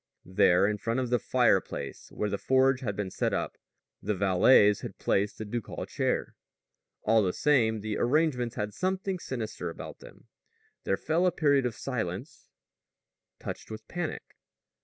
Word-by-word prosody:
There 90 Hz, 0 st, +4 dB
in 105 Hz, 0 st, -1 dB
front 115 Hz, +3 st, -1 dB
of 125 Hz, -2 st, -2 dB
the 125 Hz, -, +3 dB
fireplace -, -, 0 dB
where 105 Hz, -, -2 dB
the 100 Hz, -, -2 dB
forge 130 Hz, 0 st, +3 dB
had 110 Hz, -7 st, -3 dB
been 95 Hz, -1 st, -3 dB
set -, -, 0 dB
up, -, -, -3 dB, 0.4 s
the 105 Hz, +1 st, -1 dB
valets 100 Hz, +2 st, +5 dB
had -, -, -7 dB
placed 100 Hz, +1 st, 0 dB
the 110 Hz, -, -5 dB
ducal 115 Hz, +1 st, -4 dB
chair. -, -, -1 dB, 0.7 s
All 110 Hz, +1 st, +4 dB
the 95 Hz, -3 st, +1 dB
same, 115 Hz, -7 st, +2 dB
the 110 Hz, 0 st, -3 dB
arrangements 125 Hz, -3 st, +1 dB
had 105 Hz, -2 st, -3 dB
something 190 Hz, 0 st, -2 dB
sinister 110 Hz, -, -4 dB
about 80 Hz, -, -9 dB
them. -, -, -15 dB, 0.6 s
There 95 Hz, -, +1 dB
fell 170 Hz, +4 st, +1 dB
a -, -, +3 dB
period 140 Hz, -6 st, +2 dB
of 115 Hz, -, -5 dB
silence 115 Hz, -, -5 dB, 0.9 s
touched -, -, -7 dB
with 110 Hz, 0 st, -8 dB
panic. 175 Hz, -3 st, -4 dB
115 Hz, 160 wpm, -29 LUFS, 105-135 Hz, 0.9 s, valets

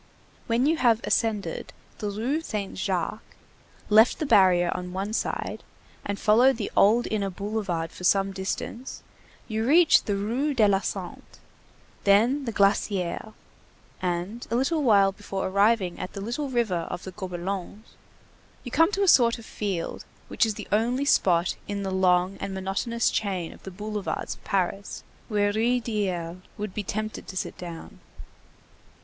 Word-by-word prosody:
When 235 Hz, +2 st, +2 dB
you 320 Hz, +2 st, +2 dB
have 235 Hz, -6 st, +4 dB
ascended 220 Hz, -3 st, -1 dB, 0.3 s
the 210 Hz, -, -2 dB
Rue 240 Hz, +10 st, -1 dB
Saint 210 Hz, -10 st, -4 dB
Jacques, 190 Hz, +2 st, -2 dB, 0.7 s
left 220 Hz, +3 st, +5 dB
the 310 Hz, -, -2 dB
barrier 185 Hz, -8 st, +5 dB
on 180 Hz, 0 st, -6 dB
one 195 Hz, +3 st, -3 dB
side -, -, -3 dB, 0.4 s
and 200 Hz, 0 st, -3 dB
followed 235 Hz, +4 st, +4 dB
the 215 Hz, -, -4 dB
old 225 Hz, +4 st, +5 dB
inner 200 Hz, -2 st, 0 dB
boulevard 195 Hz, -4 st, -3 dB
for -, -, -11 dB
some 195 Hz, +1 st, +3 dB
distance, 195 Hz, +6 st, -5 dB, 0.4 s
you 220 Hz, -1 st, -2 dB
reach 315 Hz, +7 st, +5 dB
the 205 Hz, -, 0 dB
Rue 245 Hz, +9 st, -1 dB
de 220 Hz, -4 st, +5 dB
la 195 Hz, -1 st, +3 dB
Santé, -, -, -5 dB, 0.8 s
then 235 Hz, +8 st, +3 dB
the 230 Hz, -, -2 dB
Glacière, 200 Hz, 0 st, 0 dB, 0.7 s
and, 180 Hz, +6 st, -3 dB
a 230 Hz, -, -1 dB
little 285 Hz, +6 st, +1 dB
while 200 Hz, -7 st, +5 dB
before 195 Hz, -1 st, -5 dB
arriving 200 Hz, -1 st, +2 dB
at 185 Hz, -, -5 dB
the -, -, -6 dB
little 240 Hz, +7 st, -3 dB
river 215 Hz, -9 st, 0 dB
of 175 Hz, -, -5 dB
the 190 Hz, -, -7 dB
Gobelins, 185 Hz, +3 st, -5 dB, 0.8 s
you 245 Hz, -, -7 dB
come 325 Hz, +7 st, +4 dB
to 400 Hz, -, +1 dB
a -, -, +2 dB
sort 235 Hz, -8 st, +5 dB
of 230 Hz, -, -12 dB
field 195 Hz, -7 st, -4 dB, 0.3 s
which -, -, +2 dB
is 215 Hz, -, -2 dB
the -, -, -7 dB
only 240 Hz, +6 st, +1 dB
spot 175 Hz, -, +3 dB
in 200 Hz, -1 st, -3 dB
the 190 Hz, -, -3 dB
long 185 Hz, 0 st, +2 dB
and 195 Hz, -, -4 dB
monotonous 195 Hz, +5 st, -1 dB
chain 190 Hz, -5 st, -2 dB
of -, -, -17 dB
the -, -, -8 dB
boulevards 210 Hz, +2 st, -4 dB
of -, -, -19 dB
Paris, 195 Hz, +1 st, -2 dB, 0.3 s
where 205 Hz, -1 st, +1 dB
Ruysdael 210 Hz, -7 st, -1 dB, 0.2 s
would 210 Hz, -2 st, -5 dB
be 210 Hz, -, -2 dB
tempted 215 Hz, +2 st, -4 dB
to 185 Hz, -, -7 dB
sit -, -, -3 dB
down. 170 Hz, -2 st, -9 dB
205 Hz, 160 wpm, -26 LUFS, 190-230 Hz, 0.8 s, left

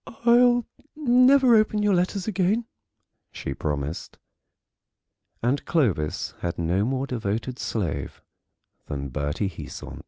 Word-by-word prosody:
"I'll 240 Hz, 0 st, +5 dB, 0.3 s
never 255 Hz, -2 st, +5 dB
open 215 Hz, -1 st, +2 dB
your 205 Hz, -1 st, +3 dB
letters 185 Hz, +2 st, 0 dB
again," 205 Hz, +3 st, +1 dB, 0.7 s
she 70 Hz, -, -5 dB
promised. 75 Hz, +2 st, -4 dB, 1.3 s
And 130 Hz, +4 st, +1 dB
Clovis 105 Hz, -, 0 dB
has 85 Hz, -, -3 dB
no 85 Hz, +4 st, +1 dB
more 130 Hz, +2 st, -1 dB
devoted 120 Hz, 0 st, -3 dB
slave 80 Hz, -11 st, -3 dB, 0.7 s
than 70 Hz, -1 st, -4 dB
Bertie 75 Hz, -, -2 dB
Heasant. 80 Hz, -5 st, -8 dB
130 Hz, 105 wpm, -25 LUFS, -, 1.3 s, I'll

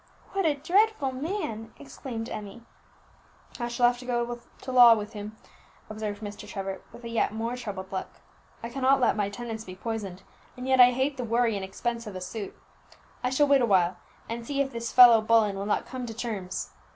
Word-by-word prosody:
"What 390 Hz, -3 st, +1 dB
a 300 Hz, -, +2 dB
dreadful 365 Hz, -1 st, +2 dB
man!" 260 Hz, -, -4 dB
exclaimed 245 Hz, -5 st, -7 dB
Emmie. 210 Hz, +3 st, -7 dB, 1.0 s
"I 240 Hz, -, -1 dB
shall 240 Hz, +1 st, +1 dB
have 245 Hz, 0 st, +3 dB
to 250 Hz, -, -10 dB
go 240 Hz, -1 st, -1 dB, 0.2 s
to 260 Hz, -, -5 dB
law 245 Hz, -2 st, +9 dB
with 210 Hz, +1 st, -6 dB
him," 210 Hz, +1 st, -7 dB, 0.5 s
observed 215 Hz, -1 st, -5 dB
Mr. 205 Hz, 0 st, -7 dB
Trevor, 195 Hz, -1 st, -5 dB
with 240 Hz, -, -13 dB
a -, -, -5 dB
yet 230 Hz, -2 st, 0 dB
more 230 Hz, +2 st, -2 dB
troubled 200 Hz, -6 st, -6 dB
look; 190 Hz, -1 st, -3 dB, 0.6 s
"I 230 Hz, -, -4 dB
cannot 270 Hz, +2 st, +2 dB
let 250 Hz, -, +3 dB
my 205 Hz, -2 st, 0 dB
tenants 220 Hz, +1 st, -6 dB
be 185 Hz, -3 st, -9 dB
poisoned, 195 Hz, -3 st, -5 dB, 0.3 s
and 250 Hz, +1 st, -6 dB
yet 260 Hz, -1 st, +5 dB
I 245 Hz, -, +9 dB
hate 265 Hz, +3 st, -1 dB
the 250 Hz, -, -3 dB
worry 230 Hz, -1 st, +1 dB
and 195 Hz, -, -3 dB
expense 230 Hz, +4 st, -4 dB
of 205 Hz, -, -7 dB
a 185 Hz, -, -5 dB
suit. 200 Hz, +2 st, -6 dB, 0.7 s
I 250 Hz, -, +1 dB
shall 265 Hz, +3 st, +3 dB
wait 280 Hz, -1 st, +5 dB
a 240 Hz, -, +2 dB
while, 180 Hz, -3 st, +3 dB, 0.3 s
and 230 Hz, +1 st, -5 dB
see 275 Hz, +4 st, -3 dB
if 275 Hz, -1 st, +1 dB
this 235 Hz, -1 st, -4 dB
fellow 240 Hz, -3 st, +9 dB
Bullen 215 Hz, -2 st, +3 dB
will 195 Hz, +1 st, -4 dB
not 210 Hz, -, 0 dB
come 255 Hz, -2 st, -6 dB
to 225 Hz, -, -7 dB
terms. 205 Hz, -6 st, -4 dB
230 Hz, 205 wpm, -27 LUFS, 210-250 Hz, 1.0 s, law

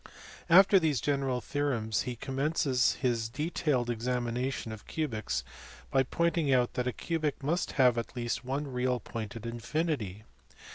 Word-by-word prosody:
After 195 Hz, +3 st, +8 dB
these 155 Hz, -6 st, +1 dB
general 135 Hz, -1 st, 0 dB
theorems 120 Hz, -7 st, -1 dB
he 125 Hz, -, -4 dB
commences 135 Hz, 0 st, +1 dB
his 120 Hz, -4 st, -1 dB
detailed 145 Hz, -1 st, 0 dB
examination 120 Hz, +1 st, -2 dB
of 110 Hz, -1 st, -9 dB
cubics 110 Hz, -, -2 dB, 0.5 s
by 135 Hz, -, +4 dB
pointing 165 Hz, +2 st, +1 dB
out 125 Hz, -2 st, +3 dB
that 125 Hz, 0 st, -1 dB
a -, -, +1 dB
cubic 155 Hz, -1 st, -2 dB
must 170 Hz, +5 st, 0 dB
have 125 Hz, -3 st, +4 dB
at 115 Hz, -, -6 dB
least 120 Hz, 0 st, -2 dB
one 135 Hz, +4 st, -2 dB
real 125 Hz, -1 st, 0 dB
point 115 Hz, -1 st, -6 dB
at 115 Hz, 0 st, -7 dB
infinity. 115 Hz, -, -2 dB
125 Hz, 145 wpm, -30 LUFS, 120-145 Hz, 0.5 s, After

